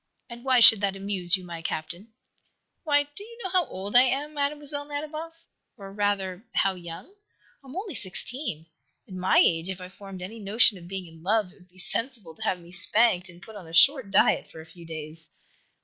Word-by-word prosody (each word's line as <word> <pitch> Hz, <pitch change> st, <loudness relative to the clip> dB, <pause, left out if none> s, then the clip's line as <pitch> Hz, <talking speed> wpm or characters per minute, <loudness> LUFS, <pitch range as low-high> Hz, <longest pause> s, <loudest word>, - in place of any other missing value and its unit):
"And 235 Hz, 0 st, -9 dB
why 260 Hz, -2 st, +4 dB
should 225 Hz, -2 st, +8 dB
that 195 Hz, -1 st, 0 dB
amuse 195 Hz, -3 st, +3 dB
you, 185 Hz, -, -11 dB
my 170 Hz, -2 st, -7 dB
Captain?" 170 Hz, +7 st, -5 dB, 0.7 s
"Why, 290 Hz, -2 st, +3 dB
do 290 Hz, +7 st, -11 dB
you 465 Hz, +2 st, -13 dB
know 375 Hz, -, -4 dB
how 365 Hz, -3 st, +2 dB
old 195 Hz, +4 st, -6 dB
I 245 Hz, -, +10 dB
am, 275 Hz, +4 st, 0 dB
Mlle. 285 Hz, 0 st, 0 dB, 0.3 s
Nadiboff? 310 Hz, +3 st, -6 dB, 0.3 s
Or 195 Hz, -2 st, -10 dB
rather, 200 Hz, -2 st, -1 dB
how 195 Hz, -, +3 dB
young? 170 Hz, -2 st, -9 dB, 0.6 s
I -, -, -16 dB
am 265 Hz, -, -10 dB
only 380 Hz, -1 st, -4 dB
sixteen. 200 Hz, -, -4 dB, 0.4 s
At 195 Hz, -, -11 dB
my 185 Hz, 0 st, +2 dB
age, 165 Hz, +2 st, +4 dB
if 190 Hz, -1 st, -5 dB
I 180 Hz, 0 st, -9 dB
formed 190 Hz, -1 st, -10 dB
any 220 Hz, +5 st, -8 dB
notion 210 Hz, 0 st, +4 dB
of 170 Hz, -, -13 dB
being 190 Hz, 0 st, -5 dB
in 165 Hz, -1 st, -15 dB
love, 205 Hz, +1 st, +1 dB
it 200 Hz, -, -22 dB
would 180 Hz, 0 st, -22 dB
be 180 Hz, -, -25 dB
sensible 225 Hz, -2 st, -2 dB
to 220 Hz, -, -19 dB
have 185 Hz, -, 0 dB
me 170 Hz, 0 st, -15 dB
spanked 185 Hz, +1 st, +4 dB
and 175 Hz, 0 st, -14 dB
put 220 Hz, -, -12 dB
on 190 Hz, -5 st, -10 dB
a 165 Hz, -, -12 dB
short 270 Hz, -, +5 dB
diet 195 Hz, -, +3 dB
for 160 Hz, -, -12 dB
a 160 Hz, -, -10 dB
few 170 Hz, 0 st, -13 dB
days." 155 Hz, 0 st, -8 dB
195 Hz, 210 wpm, -26 LUFS, 180-255 Hz, 0.7 s, I